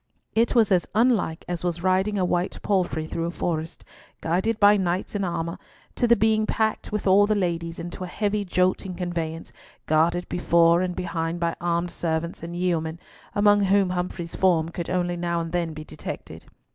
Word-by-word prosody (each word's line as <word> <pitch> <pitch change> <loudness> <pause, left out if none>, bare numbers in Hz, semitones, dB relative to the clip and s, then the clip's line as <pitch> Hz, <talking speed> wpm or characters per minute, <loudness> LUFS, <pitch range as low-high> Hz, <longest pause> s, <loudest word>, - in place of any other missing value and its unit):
It 230 +3 +2
was 225 -4 +4
as 180 -2 +3
unlike 220 -8 +2
as 175 -1 -4
was 175 -1 -2
riding 190 +3 +2
a 185 - +2
white 175 +1 -1
palfrey 180 -5 0
through 165 +1 -3
a - - -2
forest, 165 -1 -3 0.3
guided 190 +7 0
by 205 0 +7
knights 185 -2 -1
in 205 -1 -1
armour, 170 -2 -3 0.3
to 240 - +1
the 235 - +6
being 215 0 +2
packed 220 -1 -1
with 210 -1 -2
all 200 +1 +5
the 215 - +2
ladies 170 -3 -2
into 175 +2 -6
a - - -4
heavy 205 +2 -1
jolting 185 0 0
conveyance, 170 -2 -4 0.3
guarded 170 +3 +2
before 170 0 +3
and 180 -1 -2
behind 170 -1 -3
by 170 -1 0
armed 170 0 0
servants 165 0 -3
and 170 +1 -6
yeomen, 170 -2 -1 0.4
among 205 0 +5
whom 195 -1 +3
Humfrey's 180 -1 -4
form 170 -4 +2
could 170 0 -5
only 175 -1 0
now 170 0 -1
and 165 -1 -4
then 170 -2 -1
be 155 - -7
detected. 80 - -8
175 Hz, 185 wpm, -25 LUFS, 170-195 Hz, 0.4 s, by